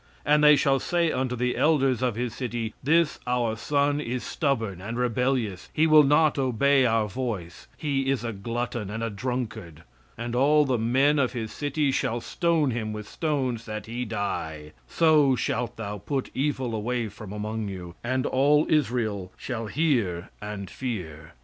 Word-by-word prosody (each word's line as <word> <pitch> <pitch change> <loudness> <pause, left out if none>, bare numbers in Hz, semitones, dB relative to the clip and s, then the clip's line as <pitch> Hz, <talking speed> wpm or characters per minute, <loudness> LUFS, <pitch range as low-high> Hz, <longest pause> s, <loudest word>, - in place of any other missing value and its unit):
"And 150 0 +4
they 150 0 +8
shall 135 -1 +2
say 170 +1 +1
unto 130 -1 -1
the 125 +1 0
elders 135 -5 +2
of 125 -4 0
his 120 -1 -2
city, 120 -3 -3
this 160 +2 +2
our 120 -3 +1
son 145 +5 +1
is 125 -2 -3
stubborn 115 - -1
and 115 +4 -5
rebellious, 125 -5 -1
he 155 - +3
will 155 -1 +7
not 150 +1 +3
obey 135 +1 +3
our 110 -2 +2
voice, 105 -7 -5
he 135 -3 -1
is 135 -3 0
a 115 -1 -3
glutton, 115 +1 -3
and 110 +2 -4
a 115 - -2
drunkard. 110 - -4 0.3
"And 120 +1 -4
all 150 +4 +4
the 130 -4 0
men 135 +6 +3
of 130 -3 +1
his 115 -3 -4
city 145 -1 0
shall 120 -2 0
stone 160 +2 +1
him 110 -2 -3
with 105 -1 -7
stones, 130 -6 -2
that 110 -1 -5
he 120 +2 -4
die; 80 -9 -4 0.2
so 150 - +4
shalt 120 -1 -2
thou 105 -2 -5
put 130 +7 -3
evil 130 -3 -1
away 115 +2 -1
from 105 0 -10
among 105 +1 -3
you; 90 -3 -7
and 130 +2 0
all 145 +3 +3
Israel 115 - 0
shall 115 -3 -4
hear 115 - 0
and 105 -2 -5
fear." 85 - -6
125 Hz, 170 wpm, -26 LUFS, 110-140 Hz, 0.3 s, they